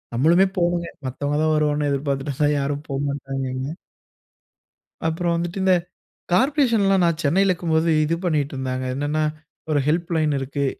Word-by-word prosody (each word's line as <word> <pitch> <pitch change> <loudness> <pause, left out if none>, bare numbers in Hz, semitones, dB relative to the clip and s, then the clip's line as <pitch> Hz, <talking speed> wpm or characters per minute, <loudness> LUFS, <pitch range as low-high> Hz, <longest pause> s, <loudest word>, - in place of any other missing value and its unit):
நம்மளுமே 170 +9 +4
போணும்ங்க. 175 -1 0 0.2
மத்தவங்க 145 +3 -2
தான் 155 0 +2
வருவாங்கன்னு 150 -1 +1
எதிர்பார்த்துட்டு 140 0 -2
இருந்தா 145 +2 +2
யாரும் 140 +1 -2
போமாட்டாங்கங்க. 135 -1 -3 1.4
அப்புறம் 170 +1 0
வந்துட்டு, 170 +2 -3
இந்த 190 -1 +5 0.6
கார்ப்ரேஷன்லாம் 230 - +3
நான் 170 -2 +1
சென்னையில 185 +6 +3
இருக்கும்போது, 165 -1 +1 0.2
இது 165 +2 0
பண்ணிட்டு 150 -5 0
இருந்தாங்க. 130 -1 -3
என்னன்னா, 145 +3 -1 0.5
ஒரு 145 - +3
ஹெல்ப்லைன் 160 -1 +1
இருக்கு. 140 +1 -2
150 Hz, 130 wpm, -22 LUFS, 140-170 Hz, 1.4 s, இந்த